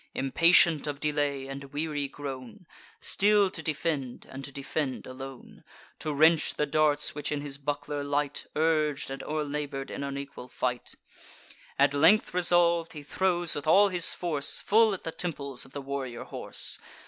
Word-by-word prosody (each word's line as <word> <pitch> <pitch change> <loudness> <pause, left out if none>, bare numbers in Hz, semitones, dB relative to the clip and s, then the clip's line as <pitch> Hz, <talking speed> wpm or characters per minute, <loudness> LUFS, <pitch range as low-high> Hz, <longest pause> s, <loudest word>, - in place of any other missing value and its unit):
Impatient 165 +3 +4
of 145 -1 -4
delay, 145 -2 -1
and 135 +1 -7
weary 145 0 -3
grown, 140 - -8 0.3
Still 205 -1 +3
to - - -5
defend, 150 -5 -3
and 135 +1 -9
to 140 - -7
defend 140 0 -3
alone, 130 0 -10 0.4
To 155 - -3
wrench 155 +2 +3
the 150 - 0
darts 150 0 +1
which 150 0 -4
in 145 -1 -2
his 140 -1 -5
buckler 145 0 -3
light, 145 0 -2
Urg'd 155 -3 +1
and 135 0 -5
o'er 155 0 -2
labour'd 145 -2 -4
in - - -5
unequal 140 -2 -6
fight; 125 -1 -3 0.8
At 140 0 +4
length 165 +10 +4
resolv'd, 170 -2 +3
he 150 -2 -8
throws 175 +2 +1
with 145 - -5
all 200 +5 +6
his 180 -3 +3
force 155 -5 +1
Full 220 -1 +3
at - - -12
the 165 - -4
temples 140 -7 -3
of 135 - -17
the 145 - -6
warrior 135 -3 -5
horse. - - -1
145 Hz, 160 wpm, -28 LUFS, 140-165 Hz, 0.8 s, all